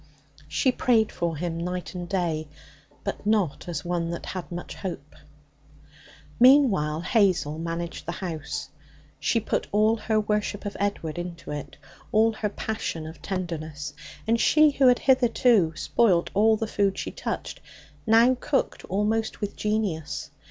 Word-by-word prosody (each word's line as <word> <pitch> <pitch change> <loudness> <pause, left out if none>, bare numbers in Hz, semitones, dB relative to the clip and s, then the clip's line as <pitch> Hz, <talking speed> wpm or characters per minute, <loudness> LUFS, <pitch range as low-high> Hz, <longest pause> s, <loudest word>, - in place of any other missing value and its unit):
She 155 - +2
prayed 230 -3 +2
for 170 -2 -2
him 165 +1 -3
night 180 +2 -4
and 175 -1 -6
day, 165 -5 -1 0.6
but 200 - -4
not 205 -8 0
as 160 -3 -4
one 170 -1 -1
that 170 - -5
had 185 -2 -6
much 175 0 -6
hope. 190 -3 -6 1.3
Meanwhile, 230 - +5
Hazel 180 -6 +2
managed 170 0 -4
the 170 - -2
house. 170 -5 -5 0.5
She 230 - +2
put - - -2
all 215 +2 +3
her 215 0 +1
worship 210 -1 -1
of 205 - -4
Edward 175 -5 -2
into 175 -3 -6
it, 145 -1 -6 0.3
all 220 +1 +4
her 215 -1 -2
passion 200 -6 -4
of 160 +1 -10
tenderness. 155 -6 -4 0.3
And 230 +1 +2
she, 305 -1 +5
who 275 -2 +4
had 250 -1 +6
hitherto 240 -8 +3
spoilt 185 -2 +2
all 220 +2 +4
the 225 - -2
food 200 -2 0
she - - -4
touched, - - -5 0.5
now 230 +3 +6
cooked 275 - -1
almost 215 +3 -1
with 205 -1 -4
genius. 210 -8 -2
195 Hz, 145 wpm, -26 LUFS, 170-220 Hz, 1.3 s, had